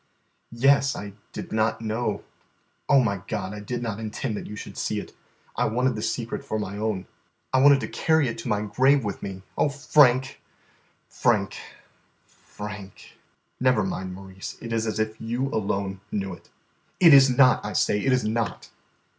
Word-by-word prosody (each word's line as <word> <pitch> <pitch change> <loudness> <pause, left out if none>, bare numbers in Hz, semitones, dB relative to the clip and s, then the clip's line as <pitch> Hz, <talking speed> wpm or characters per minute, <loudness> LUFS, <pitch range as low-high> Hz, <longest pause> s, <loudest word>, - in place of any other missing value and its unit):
"Yes, 140 +2 +4
I 100 -1 -7 0.2
did - - -7
not 110 0 +1
know 110 -1 -2 0.3
" - - -43
"Oh, 135 -2 +6
my 100 -5 -1
God, 95 - -3
I 105 - -6
did 120 +4 -4
not 110 -3 -3
intend 110 +1 -3
that - - -6
you 105 - -7
should - - -8
see - - -2
it. - - -10 0.4
I - - +1
wanted 125 +2 +1
the 110 - -4
secret 115 +1 -3
for 110 - -3
my 100 -2 -4
own. 105 -3 -2 0.5
I 130 - +4
wanted 140 0 +6
to - - -3
carry 160 -3 +2
it 115 - -4
to 115 - -6
my 105 -2 0
grave 130 +6 +3
with 100 -2 -4
me. 95 -1 -6 0.2
Oh, 150 - +3
Frank, 135 -2 +3 0.7
Frank, - - +1 0.7
Frank!" 105 -2 -10 0.4
"Never 125 -4 +3
mind, 95 -1 -4
Maurice. 95 0 -9
It 115 -1 -6
is 115 0 0
as 110 - -2
if 110 0 -2
you 120 +4 -2
alone 100 -4 -2
knew 95 -2 -2
it." 85 - -14 0.5
"It 170 -4 +8
is 135 -1 +8
not, 130 0 +5
I - - -4
say, 105 - +1
it 135 - +2
is 130 -1 +2
not!" 110 -1 -2
110 Hz, 180 wpm, -25 LUFS, 105-130 Hz, 0.7 s, It